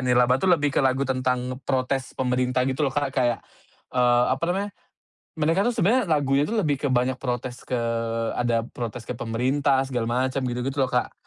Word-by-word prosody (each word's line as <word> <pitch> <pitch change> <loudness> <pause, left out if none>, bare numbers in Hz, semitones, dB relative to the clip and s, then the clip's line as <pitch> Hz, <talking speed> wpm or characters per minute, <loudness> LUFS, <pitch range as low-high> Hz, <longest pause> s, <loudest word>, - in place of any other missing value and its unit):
"Nirlaba" 125 0 +3
tuh 190 - +1
lebih 145 -5 +3
ke - - +2
lagu 135 0 +2
tentang 130 -1 -1
protes 130 0 -1
pemerintah 125 0 +1
gitu 135 +1 -2
loh - - -8
Kak, 145 -2 0
kayak, 125 -3 0 0.5
eee, 125 -1 +4
apa 130 - -2
namanya, 195 +3 -1 0.7
mereka 165 +6 +2
tuh 240 - +1
sebenernya 230 +3 +2
lagunya 145 -4 +2
tuh 220 +5 0
lebih 145 -5 -1
ke 135 - +1
banyak 125 +1 +1
protes 125 -1 -4
ke 125 -2 -1 0.6
ada 120 -1 +1
protes 120 -1 -6
ke 125 - -3
pemerintah, 130 +4 +1
segala 120 -3 -1 0.2
macam 135 +1 -2
gitu-gitu 125 +3 -3
loh - - -8
Kak. 125 - 0
130 Hz, 180 wpm, -24 LUFS, 125-145 Hz, 0.7 s, eee